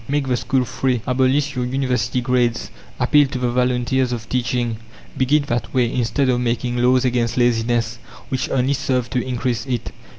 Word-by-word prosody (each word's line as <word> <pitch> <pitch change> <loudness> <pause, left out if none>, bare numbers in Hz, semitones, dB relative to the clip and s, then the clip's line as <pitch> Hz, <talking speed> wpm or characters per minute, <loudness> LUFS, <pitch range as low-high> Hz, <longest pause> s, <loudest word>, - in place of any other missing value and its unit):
Make 140 -1 0
the 125 - +2
school 130 +1 0
free, 125 -2 -1
abolish 135 +3 +1
your 125 - -1
University 125 -1 -1
grades, 120 -1 0 0.3
appeal 145 +3 +4
to 130 - -5
the 125 -1 0
volunteers 125 +1 +1
of 115 -2 -4
teaching; 120 -2 -1 0.4
begin 145 +3 +2
that 120 -4 -3
way, 120 -2 +2
instead 125 +3 0
of 125 -1 +2
making 120 0 -1
laws 125 +1 +3
against 120 -1 0
laziness 120 -1 +1 0.3
which 130 0 -2
only 135 +1 +1
serve 130 -3 -1
to 125 - 0
increase 125 -2 -2
it. 125 -3 -3
125 Hz, 170 wpm, -20 LUFS, 120-130 Hz, 0.4 s, appeal